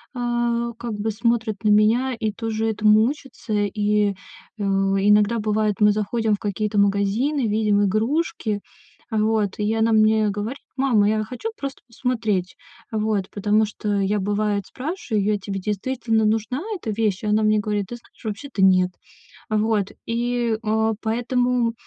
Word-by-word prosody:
э, 240 -1 -1
как 235 -1 -5
бы 210 +1 -2
смотрит 225 -2 -1
на 215 - +3
меня 220 +5 +4
и 220 -2 -1
тоже 225 +1 -2
этому 215 0 +4
учится. 265 -4 -5
И, 210 0 +1
э, 200 +2 -12
иногда 200 +3 +3
бывает, 215 -1 +1
мы 210 -1 +6
заходим 215 +1 0
в - - -12
какие-то 210 +1 -2
магазины, 200 +7 +1
видим 210 -1 +2
игрушки. 220 - 0 0.5
Вот, 215 -2 +1
и 210 +1 +1
она 225 0 +2
мне 215 -1 +4
говорит: 210 +7 -4 0.2
"Мама, 235 -7 +3
я 215 0 +1
хочу 250 - -5
просто 275 -1 -6
посмотреть". 225 -6 -1 0.4
Вот, 215 -3 0
потому 210 +2 +2
что 210 0 -3
я, 200 +2 +1
бывает, 205 0 -1
спрашиваю: 240 - -2
"А - - -1
тебе 195 0 -4
действительно 220 +3 -1
нужна 220 +5 0
эта 280 - -4
вещь?" 210 -2 -1
Она 210 0 +2
мне 215 0 +3
говорит: 205 -1 -2
"Ты 240 - -6
знаешь, 240 - -18
вообще-то 220 +1 -4
нет". 185 -1 +4 0.6
Вот, 215 -2 +1 0.2
и, 235 -1 0
э, 220 0 +1
поэтому 245 +1 0
215 Hz, 150 wpm, -22 LUFS, 205-230 Hz, 0.6 s, мы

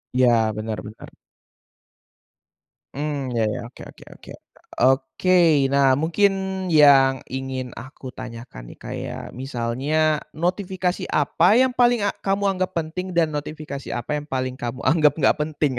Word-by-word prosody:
Iya, 125 -1 +5 0.3
benar 110 0 -4
benar. 110 - -12 1.8
Mmm, 140 -3 -3
iya 115 -2 0
iya, 105 - -3
oke - - -15
oke - - -17
oke, - - -14 0.5
oke. 135 +8 +3 0.3
Nah, 140 -1 +4
mungkin 170 +7 +2 0.4
yang 140 -4 +5
ingin 130 -1 -4
aku 130 0 -10
tanyakan 115 - -10
nih, - - -12
kayak - - -6
misalnya 135 +5 -1 0.2
notifikasi 180 +1 -2
apa 165 +7 +3
yang 260 +1 +4
paling 240 -3 +2
a 205 - +1
kamu 195 +1 -1
anggap 185 0 -2
penting 170 +3 -3
dan 160 -2 +2
notifikasi 150 -1 -6
apa 120 +4 -5
yang 150 - -12
paling 130 -1 -3
kamu 120 +3 -5
anggap 155 -3 +4
nggak 150 - +2
penting? 150 -2 -1
145 Hz, 135 wpm, -22 LUFS, 130-170 Hz, 1.8 s, Iya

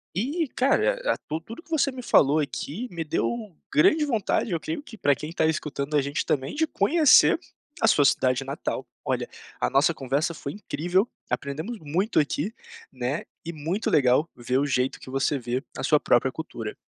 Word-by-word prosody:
E 290 - 0
cara, 440 - +2
e - - +2
tudo 155 +2 -3
tudo 230 - -10
que - - -26
você 290 -3 +2
me 255 -1 -8
falou 145 - +4
aqui 150 - -4
me 165 -2 -3
deu 210 +7 -2 0.2
grande 300 - +4
vontade, 225 -5 0
eu 165 - 0
creio 160 - -4
que 225 - -12
para 145 -8 +2
quem 155 +2 -7
está 170 - 0
escutando 150 -2 -2
a - - +4
gente 140 +1 -2
também 135 -2 -1
de 320 +1 +1
conhecer 295 +8 +5 0.4
a 225 - +4
sua 145 -9 +5
cidade 130 +1 +2
natal, 135 +1 -4 0.2
olha, - - -1 0.3
a - - +1
nossa 145 +6 +4
conversa 140 +3 -1
foi 140 - -6
incrível, 185 +1 0 0.2
aprendemos 155 +11 -3
muito 170 +7 0
aqui 150 +7 -1 0.4
né, 130 +4 -3 0.2
e 170 - -5
muito 165 +7 -2
legal 140 +4 +3
ver 125 +2 0
o 145 - +1
jeito 130 -1 0
que - - -11
você 135 +1 0
vê 125 +3 -3
a - - -5
sua 150 -2 +4
própria 130 +2 +2
cultura. 120 -9 -6
155 Hz, 190 wpm, -25 LUFS, 140-220 Hz, 0.4 s, conhecer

